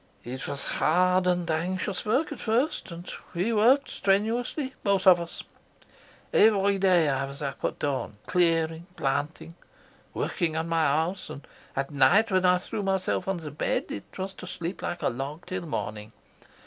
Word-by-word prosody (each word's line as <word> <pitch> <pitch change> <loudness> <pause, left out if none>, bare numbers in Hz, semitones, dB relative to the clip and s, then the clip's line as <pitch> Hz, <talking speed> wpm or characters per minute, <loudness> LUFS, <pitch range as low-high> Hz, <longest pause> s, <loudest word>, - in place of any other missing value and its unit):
"It 125 +2 -5
was 140 0 -3
hard 180 +2 +2
and 180 -1 +1
anxious 180 +6 -1
work 265 +9 +1
at 290 - -6
first, 245 +7 0
and 170 +1 -9 0.3
we 190 +7 0
worked 245 +6 +4
strenuously, 230 +7 0
both 200 -2 +2
of 180 -2 +7
us. 170 - -7 0.9
Every 200 -2 +4
day 180 -4 +4
I 135 -1 0
was 140 +1 -7
up 140 -1 -5
at - - -1
dawn, 135 -7 -2
clearing, 165 -2 +1
planting, 150 +4 -2 0.6
working 165 -3 -1
on 160 +1 -1
my 165 -1 +2
house, 160 +6 0
and 140 - -9 0.3
at 135 +1 -2
night 175 +11 +4
when 185 -1 +3
I 180 0 +5
threw 185 +3 -4
myself 190 -1 0
on 185 -4 -2
my 150 - -5
bed 145 - -2
it 100 - -8
was 190 0 -4
to - - -8
sleep 170 +2 -5
like 175 0 -4
a - - +3
log 140 +6 -5
till 185 -2 -4
morning. 105 -6 -4
175 Hz, 170 wpm, -27 LUFS, 150-195 Hz, 0.9 s, of